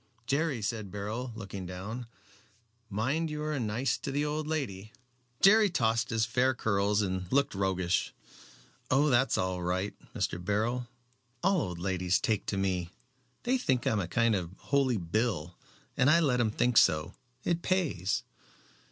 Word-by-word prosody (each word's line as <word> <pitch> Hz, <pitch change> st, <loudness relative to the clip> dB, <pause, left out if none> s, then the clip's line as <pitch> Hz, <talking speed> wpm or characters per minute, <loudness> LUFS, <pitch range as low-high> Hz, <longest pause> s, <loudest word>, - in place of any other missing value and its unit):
"Jerry," 140 Hz, -3 st, 0 dB
said 105 Hz, -1 st, -3 dB
Beryl, 105 Hz, +6 st, -4 dB
looking 100 Hz, -4 st, -6 dB
down, 105 Hz, +7 st, -6 dB, 0.8 s
"mind 130 Hz, +11 st, 0 dB
you 150 Hz, 0 st, -4 dB
are 150 Hz, -2 st, -1 dB
nice 120 Hz, +3 st, 0 dB
to 140 Hz, -, -4 dB
the 145 Hz, +2 st, 0 dB
old 150 Hz, +1 st, -2 dB
lady." 110 Hz, -10 st, -3 dB, 0.5 s
Jerry 210 Hz, +1 st, +7 dB
tossed 115 Hz, -8 st, +1 dB
his 115 Hz, -1 st, +1 dB
fair 125 Hz, +3 st, +2 dB
curls 105 Hz, -2 st, +1 dB
and 95 Hz, -1 st, -3 dB
looked 140 Hz, +1 st, +2 dB
roguish. 95 Hz, -2 st, 0 dB, 0.8 s
"Oh, 145 Hz, +3 st, +3 dB
that's 125 Hz, 0 st, +3 dB
all 90 Hz, -1 st, -1 dB
right, 90 Hz, +3 st, -1 dB, 0.2 s
Mr. 85 Hz, -, -2 dB
Beryl. 115 Hz, +5 st, 0 dB, 0.6 s
All 190 Hz, -2 st, +3 dB
old 90 Hz, -7 st, -4 dB
ladies 90 Hz, 0 st, +1 dB
take 110 Hz, -7 st, -1 dB
to 100 Hz, -, -1 dB
me. 90 Hz, -3 st, -1 dB, 0.5 s
They 255 Hz, +1 st, +1 dB
think 130 Hz, -, 0 dB
I'm 115 Hz, -6 st, +2 dB
a 90 Hz, -, -2 dB
kind 115 Hz, +4 st, +2 dB
of 90 Hz, -4 st, -1 dB
Holy 135 Hz, -4 st, +1 dB
Bill, 90 Hz, -2 st, -1 dB, 0.4 s
and 125 Hz, -, +4 dB
I 170 Hz, +3 st, +6 dB
let 140 Hz, -7 st, +2 dB
them 120 Hz, -3 st, +2 dB
think 120 Hz, +2 st, +1 dB
so. 75 Hz, 0 st, +4 dB, 0.3 s
It 170 Hz, -1 st, 0 dB
pays." 160 Hz, -, 0 dB
115 Hz, 155 wpm, -30 LUFS, 95-135 Hz, 0.8 s, Jerry